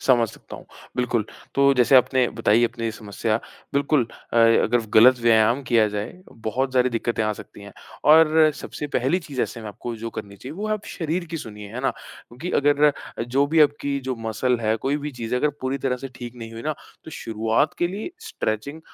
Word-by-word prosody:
समझ 120 -4 +3
सकता - - -11
हूँ, - - -13 0.3
बिल्कुल। 120 -3 0 0.3
तो 140 0 +5
जैसे 125 +1 +5
आपने 130 0 +4
बताई 115 0 +2
अपनी 115 0 -3
ये 115 - 0
समस्या, 110 +1 -2 0.4
बिल्कुल 140 -2 +2 0.3
अ, - - -1
अगर 115 0 +4
गलत 125 +3 +7
व्यायाम 115 +3 +4
किया 115 -3 +3
जाए, 105 0 -4 0.2
बहुत 125 +4 -2
सारी 125 0 +4
दिक्कतें 115 -1 -1
आ 110 - 0
सकती 100 - -12
हैं 100 - -11 0.4
और 160 0 +6
सबसे 150 - -6
पहली 135 +9 +2
चीज़ 145 -6 -5
ऐसे 115 - -4
में 110 - -7
आपको 115 +3 -6
जो 115 +1 -6
करनी 100 -1 -8
चाहिए, 125 +8 -9
वो 210 +3 -4
है 215 - 0
आप 215 - -3
शरीर 170 +1 -3
की 165 - -3
सुनिए 105 -7 -8
है 125 - -4
ना, 135 - +1
क्योंकि 145 +10 -10
अगर 145 +1 +2
अ, 145 - +6 0.3
जो 135 +4 +1
भी 160 +1 +2
आपकी 140 -1 +2
जो 130 - -1
मसल 125 +3 0
है, 110 0 +1
कोई 135 +6 -1
भी 150 0 -4
चीज़ 120 -2 -4
है, 125 - 0
अगर 150 - +3
पूरी 130 +1 -2
तरह 130 -1 -1
से 135 +2 -7
ठीक 120 -1 -8
नहीं 115 -1 -8
हुई 115 0 -8
ना 155 0 -1 0.3
तो 160 - -9
शुरुआत 115 +3 0
के 175 - +2
लिए 205 - -5
स्ट्रेंचिंग 140 +9 -4
125 Hz, 215 wpm, -23 LUFS, 115-145 Hz, 0.4 s, गलत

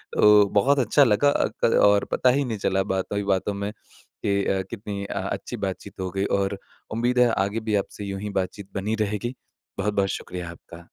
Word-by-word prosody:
तो 105 -1 +7
बहुत 135 +7 +4
अच्छा 130 +4 +4
लगा 125 +4 +4
अ, - - +2 0.2
क 115 - +3
और 100 0 +5
पता 130 - +3
ही 140 +3 +2
नहीं 115 -3 -3
चला 95 0 +1
बातों 95 +2 -2
ही 100 - -1
बातों 100 +1 0
में 100 +1 -3
कि 100 -1 -4
अ, 95 -1 +1
कितनी 100 -3 -5
अ, - - -4
अच्छी - - -4
बातचीत - - -5
हो 95 0 -2
गई। 95 +2 -1
और 100 0 -1 0.4
उम्मीद 120 +2 +1
है 125 - +6 0.2
आगे 105 +3 -2
भी 105 - +2
आपसे 100 +1 -3
यूँ 100 -1 -4
ही 105 - -4
बातचीत 100 +1 -7
बनी 105 +3 -1
रहेगी, 105 +5 -3 0.4
बहुत-बहुत 100 -1 +1
शुक्रिया 90 -2 -5
आपका। 85 0 -13
100 Hz, 205 wpm, -24 LUFS, 95-110 Hz, 0.4 s, तो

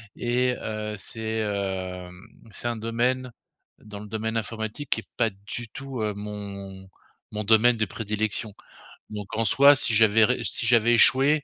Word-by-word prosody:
et, 125 +1 0
heu, 110 0 -4
c'est, 110 +2 -3
heu, 95 -3 -3 0.4
c'est 110 - -4
un 120 -1 -2
domaine, 120 +3 -1 0.5
dans 105 -1 -10
le 105 - -9
domaine 110 +1 -3
informatique, 110 +5 -5
qui 115 - +1
est - - -26
pas 115 -2 +3
du 105 +4 -8
tout, 135 0 -6
heu, 105 -1 -1
mon 100 -2 -8 0.4
mon 105 0 -4
domaine 110 +3 +5
de 110 -1 0
prédilection. 105 +1 -3 0.6
Donc 105 -2 -6
en 115 - +1
soi, 140 +5 +6
si 145 -4 +2
j'avais 110 0 +5
ré 125 +3 -1
si - - -1
j'avais 120 0 +4
échoué, 140 +5 +5
110 Hz, 165 wpm, -25 LUFS, 105-120 Hz, 0.6 s, soi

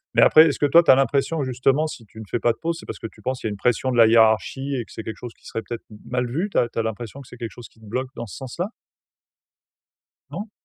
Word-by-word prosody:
mais - - +6
après 155 +1 +8
est-ce 145 - -1
que - - +3
toi 165 +4 +7
tu - - -3
as 130 - +8
l'impression 140 +4 +1
justement 130 +4 +1
si 120 -6 -9
tu 110 - -20
ne 110 - -8
fais - - -1
pas 120 - +3
de 115 - -7
pause, 165 0 -1
c'est - - -12
parce - - -6
que 115 - -5
tu 110 - -18
penses 130 +2 -3
il 110 - 0
y - - -1
a - - -4
une - - -4
pression 125 +4 +1
de 120 - -1
la 115 -1 +8
hiérarchie 115 +5 +3
et 120 - -2
que - - -18
c'est 110 - -7
quelque 110 - -6
chose 120 -2 -8
qui - - -26
serait 115 - -4
peut-être 120 0 -7
m 105 - -11
mal 125 0 -1
vu? 170 +12 -1
Tu - - -2
as 120 - +3
tu - - -4
as 115 - +1
l'impression 115 +4 -5
que 130 - -14
c'est 125 - -12
quelque 115 -2 -5
chose 120 - -11
qui - - -26
te 110 - -16
bloque 125 +4 -3
dans 120 - -5
ce 100 - -10
sens-là? 170 - -4 1.6
Non? 210 +2 -6
125 Hz, 315 wpm, -23 LUFS, 115-140 Hz, 1.6 s, après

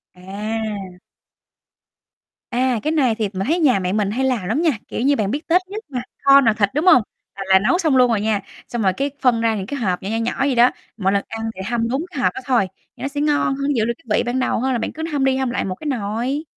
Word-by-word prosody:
À. 200 0 -5 1.5
À, 250 -1 +1
cái 310 - 0
này 260 -8 +2
thì 215 -3 -1
m 190 - -5
thấy 335 +4 +1
nhà 255 -11 +4
mẹ 185 +1 -2
mình 205 -2 0
hay 260 +5 0
làm 240 -8 0
lắm 235 - 0
nha, 330 -3 +3 0.2
kiểu - - -4
như, 280 +2 +3
bạn 210 -3 -1
biết 295 +4 -4
Tết 350 +2 +4
nhất 425 +3 -7
mà 250 -3 -3 0.2
kho 275 0 +7
nồi 225 -4 +3
thịt, 200 -2 +2
đúng 305 +5 +1
hông? 255 -9 +7 0.3
Là 195 - -5
là 190 0 +6
nấu 280 - +2
xong 315 -7 +1
luôn 250 -1 +5
rồi 215 -3 +1
nha, 215 -2 0 0.3
xong 240 -2 -3
là 190 -2 +3
cái 275 +9 -2
phân 240 -3 +3
ra 225 -1 +2
những 190 -2 -4
cái 280 +5 -5
hộp 185 -6 -1
nhỏ, 195 - -4
nhỏ, 225 - -1
nhỏ 230 +1 -1
vậy 270 -2 +1
đó, 240 +1 +6 0.3
mọi 195 -2 +1
lần 200 - +1
ăn 225 0 -4
thì 190 - -7
hâm 230 -1 0
đúng 275 +7 -1
cái - - -5
hộp - - +2
đó 390 - -6
thôi, 240 -8 +2 0.3
thì - - -13
nó - - 0
sẽ 290 +1 -3
ngon 295 -2 +1
hơn, 280 +1 -1
giữ 220 -2 +2
được 235 - 0
cái 230 -10 -1
vị - - +1
ban 245 +2 -1
đầu 255 - 0
hơn 265 +2 0
là - - +1
bạn - - -3
cứ 320 - -6
hâm 285 -2 0
đi 265 0 +2
hâm 265 -2 0
lại 240 - -2
một 185 - -3
cái 305 - -8
nồi. 245 +4 -2
240 Hz, 280 wpm, -20 LUFS, 210-275 Hz, 1.5 s, kho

